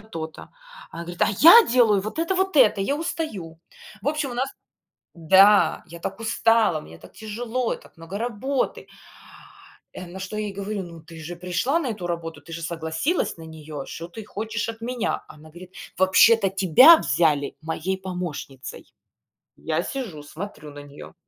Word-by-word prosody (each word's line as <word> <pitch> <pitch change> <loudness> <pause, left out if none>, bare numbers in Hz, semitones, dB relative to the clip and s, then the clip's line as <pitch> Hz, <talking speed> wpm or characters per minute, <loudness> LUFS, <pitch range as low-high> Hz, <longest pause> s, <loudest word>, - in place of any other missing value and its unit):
то-то". 165 -7 -8 0.4
Она 170 - -7
говорит: 175 0 -4
"А - - +4
я 350 +9 +10
делаю 230 -5 +4
вот 215 +8 -6
это, 335 +3 0
вот 380 -2 0
это. 220 -7 +5
Я 280 +9 0
устаю". 205 - -5 0.4
В 280 - 0
общем, 300 -3 -2
у 245 - -6
нас 260 +2 -1 0.7
Да. 190 +2 +5
"Я 170 +1 -11
так 195 +4 -5
устала, 225 -6 +2
мне 80 - -13
так - - -16
тяжело, 230 +3 -3
и - - -7
так - - -20
много 165 +4 -7
работы". 245 +4 -2 1.1
Э, 185 - -8
на 180 +2 -9
что 195 +3 -6
я 215 - -2
ей 200 - -6
говорю: 200 0 -4
"Ну 170 -2 -11
ты 165 0 -13
же 175 +3 -7
пришла 180 - -1
на 295 - -3
эту 205 -6 -4
работу. 165 -1 -5
Ты 165 - -14
же 165 - -6
согласилась 165 - -2
на 165 - -11
неё. 155 -3 -8
Что 165 - -8
ты 210 +5 -10
хочешь 220 +2 -4
от 225 0 -7
меня?" 240 -1 -2
Она 155 +1 -15
говорит: 180 +3 -13 0.2
"Вообще-то 195 +2 +5
тебя 195 - +7
взяли 150 - +1
моей 165 +4 -3
помощницей". 175 -8 -7 0.6
Я 160 +2 -2
сижу, 200 - -6
смотрю 155 -2 -9
на 145 - -10
неё, 145 0 -12
190 Hz, 175 wpm, -24 LUFS, 165-230 Hz, 1.1 s, я